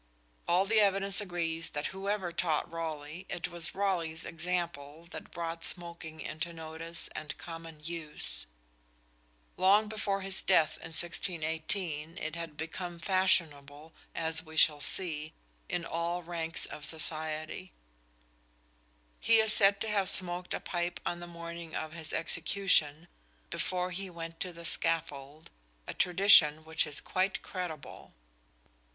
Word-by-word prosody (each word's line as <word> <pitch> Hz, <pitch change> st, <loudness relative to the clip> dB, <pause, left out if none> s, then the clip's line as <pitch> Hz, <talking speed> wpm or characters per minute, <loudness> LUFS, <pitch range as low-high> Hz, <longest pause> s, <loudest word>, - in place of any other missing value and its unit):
All 180 Hz, +3 st, +3 dB
the 220 Hz, +2 st, +3 dB
evidence 195 Hz, 0 st, +4 dB
agrees 165 Hz, -4 st, 0 dB
that 145 Hz, 0 st, -4 dB
whoever 195 Hz, -2 st, -2 dB
taught 165 Hz, -3 st, 0 dB
Raleigh, 160 Hz, +1 st, -5 dB
it 175 Hz, -, -3 dB
was 170 Hz, -2 st, -2 dB
Raleigh's 170 Hz, -5 st, -1 dB
example 165 Hz, -3 st, -3 dB
that -, -, -8 dB
brought 165 Hz, 0 st, -5 dB
smoking 170 Hz, -3 st, 0 dB
into 170 Hz, +2 st, -4 dB
notice 165 Hz, +1 st, -6 dB
and 150 Hz, -1 st, -6 dB
common 165 Hz, -2 st, -9 dB
use. 155 Hz, -, -4 dB, 1.1 s
Long 200 Hz, +3 st, +5 dB
before 205 Hz, -2 st, -1 dB
his 190 Hz, 0 st, -2 dB
death 165 Hz, -5 st, +3 dB
in -, -, -9 dB
1618 165 Hz, -1 st, 0 dB
it 155 Hz, +1 st, -4 dB
had 165 Hz, -3 st, -6 dB
become 175 Hz, +2 st, -5 dB
fashionable, 160 Hz, -5 st, +1 dB, 0.2 s
as 160 Hz, -1 st, +1 dB
we 160 Hz, -1 st, -11 dB
shall 150 Hz, -2 st, +4 dB
see, 155 Hz, -2 st, +1 dB, 0.4 s
in 175 Hz, -1 st, -2 dB
all 170 Hz, +2 st, -2 dB
ranks 165 Hz, -1 st, -1 dB
of 150 Hz, -, -9 dB
society. 155 Hz, +3 st, 0 dB, 1.5 s
He 230 Hz, -, +5 dB
is 220 Hz, -1 st, +5 dB
said 200 Hz, -1 st, +5 dB
to 225 Hz, -, 0 dB
have 200 Hz, -3 st, +2 dB
smoked 180 Hz, -1 st, +2 dB
a -, -, -3 dB
pipe 175 Hz, 0 st, -3 dB
on 175 Hz, -, -2 dB
the 175 Hz, -, -8 dB
morning 170 Hz, -1 st, -8 dB
of 155 Hz, 0 st, -4 dB
his 160 Hz, -2 st, -6 dB
execution, 165 Hz, -3 st, +2 dB, 0.4 s
before 180 Hz, 0 st, -1 dB
he 190 Hz, +2 st, -4 dB
went 165 Hz, -1 st, -8 dB
to 180 Hz, -, -3 dB
the 170 Hz, 0 st, -10 dB
scaffold, 150 Hz, -2 st, -1 dB, 0.3 s
a -, -, -5 dB
tradition 170 Hz, -5 st, +6 dB
which 160 Hz, 0 st, 0 dB
is 145 Hz, -, +1 dB
quite 185 Hz, +1 st, -1 dB
credible. 175 Hz, -, -7 dB
170 Hz, 135 wpm, -31 LUFS, 160-180 Hz, 1.5 s, tradition